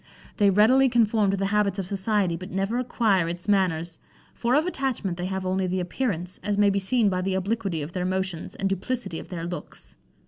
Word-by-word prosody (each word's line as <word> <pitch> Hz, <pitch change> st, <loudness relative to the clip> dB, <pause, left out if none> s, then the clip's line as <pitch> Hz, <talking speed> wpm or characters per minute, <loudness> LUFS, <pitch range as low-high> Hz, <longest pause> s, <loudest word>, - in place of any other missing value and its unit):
They 205 Hz, -2 st, +5 dB
readily 240 Hz, +7 st, +5 dB
conform 220 Hz, -3 st, +3 dB
to 195 Hz, -, +1 dB
the 195 Hz, -, 0 dB
habits 205 Hz, -2 st, +2 dB
of 195 Hz, -, -2 dB
society, 195 Hz, -2 st, 0 dB
but 185 Hz, +3 st, -8 dB
never 195 Hz, +5 st, -1 dB
acquire 215 Hz, -8 st, +1 dB
its 175 Hz, +2 st, -6 dB
manners; 175 Hz, -5 st, +1 dB, 0.3 s
for 240 Hz, +2 st, 0 dB
of 305 Hz, +3 st, +3 dB
attachment 265 Hz, -, -2 dB
they 175 Hz, +1 st, -3 dB
have 190 Hz, 0 st, -3 dB
only 185 Hz, 0 st, 0 dB
the 185 Hz, +1 st, -1 dB
appearance, 180 Hz, -1 st, -3 dB
as 205 Hz, +1 st, -1 dB
may 205 Hz, -1 st, +4 dB
be 200 Hz, -, +1 dB
seen 220 Hz, +3 st, +2 dB
by 185 Hz, -2 st, 0 dB
the 190 Hz, +1 st, -1 dB
obliquity 190 Hz, -4 st, -1 dB
of 150 Hz, -, -7 dB
their 180 Hz, 0 st, -3 dB
motions, 185 Hz, -2 st, -2 dB
and 195 Hz, -, -1 dB
duplicity 195 Hz, -1 st, -3 dB
of -, -, -10 dB
their 170 Hz, -2 st, -5 dB
looks. 175 Hz, +1 st, -7 dB
195 Hz, 210 wpm, -25 LUFS, 180-215 Hz, 0.3 s, They